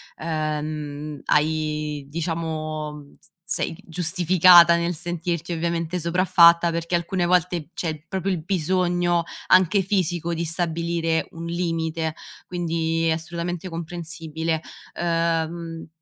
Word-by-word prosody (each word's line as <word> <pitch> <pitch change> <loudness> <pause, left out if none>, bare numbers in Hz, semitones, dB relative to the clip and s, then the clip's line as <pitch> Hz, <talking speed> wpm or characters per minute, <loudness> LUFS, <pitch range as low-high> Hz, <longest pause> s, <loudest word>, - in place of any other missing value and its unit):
ehm, 150 -2 -3
hai 150 -1 0
diciamo, 155 -2 -4
s - - -25 0.2
sei - - -1
giustificata 175 0 +6
nel 170 +1 0
sentirti, 170 0 -3
ovviamente, 170 +1 -2
sopraffatta 170 0 +5
perché 170 +1 -1
alcune 175 +1 0
volte 175 -2 +1
c'è 155 -3 -4
proprio 190 0 -2
il 180 -5 -1
bisogno, 175 -1 +1 0.2
anche 185 +2 +5
fisico, 175 -3 0
di 165 0 -2
stabilire 165 0 -1
un 165 0 -7
limite, 165 -2 -2 0.3
quindi 165 -2 -1
è - - +3
assolutamente 170 +2 -3
comprensibile. 165 -1 -4 0.4
Uhm, 165 -1 -1
170 Hz, 105 wpm, -23 LUFS, 160-175 Hz, 0.4 s, giustificata